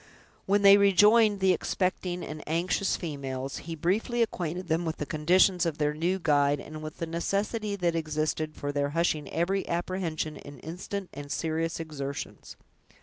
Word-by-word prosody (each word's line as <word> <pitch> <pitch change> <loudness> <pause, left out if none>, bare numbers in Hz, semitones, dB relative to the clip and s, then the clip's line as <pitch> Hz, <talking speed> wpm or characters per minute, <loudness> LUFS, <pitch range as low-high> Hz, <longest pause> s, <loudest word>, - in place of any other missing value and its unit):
When 200 +1 +3
they 200 0 +9
rejoined 205 +1 +5
the 190 -1 +5
expecting 180 0 -2
and 155 0 -7
anxious 175 +5 0
females, 135 -4 -4
he 165 - -3
briefly 215 +9 +1
acquainted 180 -4 -4
them 165 +1 +1
with 160 -1 -3
the 150 - -3
conditions 175 +5 +3
of 165 -3 -1
their 150 -1 +1
new 170 +5 0
guide, 145 -4 +2
and 155 +2 -8
with 155 -1 -7
the 165 - -3
necessity 200 +5 -2
that 175 -3 0
existed 155 -1 -2
for 145 - -3
their 145 0 0
hushing 155 -4 0
every 190 +4 0
apprehension 170 -3 -2
in 145 0 -11
instant 185 +4 -5
and 145 +1 -8
serious 165 +1 -1
exertions. 140 -4 -6
165 Hz, 160 wpm, -28 LUFS, 155-190 Hz, -, they